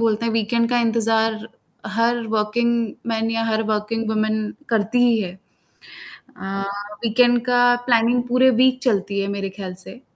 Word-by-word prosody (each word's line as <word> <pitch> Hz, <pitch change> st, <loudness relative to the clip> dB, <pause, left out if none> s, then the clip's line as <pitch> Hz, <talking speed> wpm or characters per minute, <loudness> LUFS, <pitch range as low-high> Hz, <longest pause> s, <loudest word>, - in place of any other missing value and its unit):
बोलते 225 Hz, 0 st, +1 dB
हैं 230 Hz, -, -1 dB
वीकेंड 230 Hz, +1 st, +1 dB
का 245 Hz, -, +2 dB
इंतज़ार 225 Hz, -1 st, +1 dB, 0.6 s
हर 235 Hz, +1 st, +1 dB
वर्किंग 220 Hz, +3 st, +1 dB, 0.3 s
मेन 225 Hz, 0 st, -1 dB
या 225 Hz, 0 st, -1 dB
हर 225 Hz, 0 st, 0 dB
वर्किंग 215 Hz, +1 st, -2 dB
वूमेन 215 Hz, 0 st, -1 dB, 0.2 s
करती 225 Hz, +1 st, 0 dB
ही 240 Hz, -2 st, +3 dB
है। 185 Hz, -4 st, -4 dB, 1.1 s
अ, 195 Hz, 0 st, -4 dB, 0.4 s
वीकेंड 240 Hz, +2 st, +3 dB
का 245 Hz, -1 st, +2 dB, 0.3 s
प्लानिंग 240 Hz, 0 st, +2 dB
पूरे 255 Hz, +2 st, +4 dB
वीक 260 Hz, 0 st, +3 dB
चलती 200 Hz, -4 st, 0 dB
है 195 Hz, -, -1 dB
मेरे 200 Hz, -1 st, -3 dB
ख्याल 190 Hz, -1 st, -7 dB
से 250 Hz, -, -12 dB
225 Hz, 155 wpm, -21 LUFS, 210-240 Hz, 1.1 s, पूरे